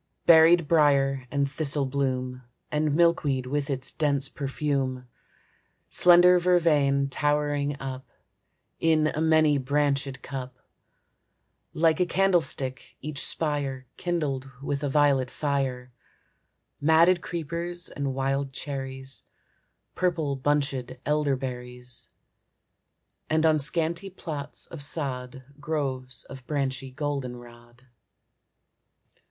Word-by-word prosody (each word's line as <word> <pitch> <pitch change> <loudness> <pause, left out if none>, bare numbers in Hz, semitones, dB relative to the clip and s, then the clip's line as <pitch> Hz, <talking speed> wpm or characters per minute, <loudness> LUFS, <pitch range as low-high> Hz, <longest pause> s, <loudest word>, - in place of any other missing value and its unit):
Berried 165 0 +7
brier 140 -4 +3
and 140 +1 0
thistle 145 -1 0
bloom, 130 -2 -2 0.3
And 150 -1 +1
milkweed 155 -6 +2
with 145 +2 -2
its 130 -1 -2
dense 140 -3 +1
perfume; 135 -2 -2 0.8
Slender 180 0 +6
vervain 150 -6 +3
towering 145 0 0
up 130 -1 -6 0.7
In 155 -1 +3
a 155 - -2
many 155 -2 +4
branchèd 140 -1 -1
cup, 130 -1 -6 1.2
Like 160 +1 +3
a 180 - +2
candlestick, 170 -8 0
each 150 -1 -4
spire 145 -4 -1
Kindled 145 -7 -2
with 140 -1 -2
a 145 - -1
violet 135 -3 +3
fire; 135 -4 -2 0.9
Matted 165 +4 +4
creepers 170 +2 -4
and 140 -2 -3
wild 135 0 -1
cherries, 135 -1 -6 0.7
Purple 165 -6 0
bunchèd 135 -2 -1
elderberries, 125 -4 -3 1.2
And 155 0 +2
on 155 -1 +4
scanty 165 +5 -1
plots 155 -6 -6
of 165 - -10
sod 130 -3 -2 0.2
Groves 135 -5 -3
of 130 -1 -12
branchy 135 -3 -2
goldenrod. 125 -3 -6
140 Hz, 100 wpm, -26 LUFS, 130-155 Hz, 1.2 s, Berried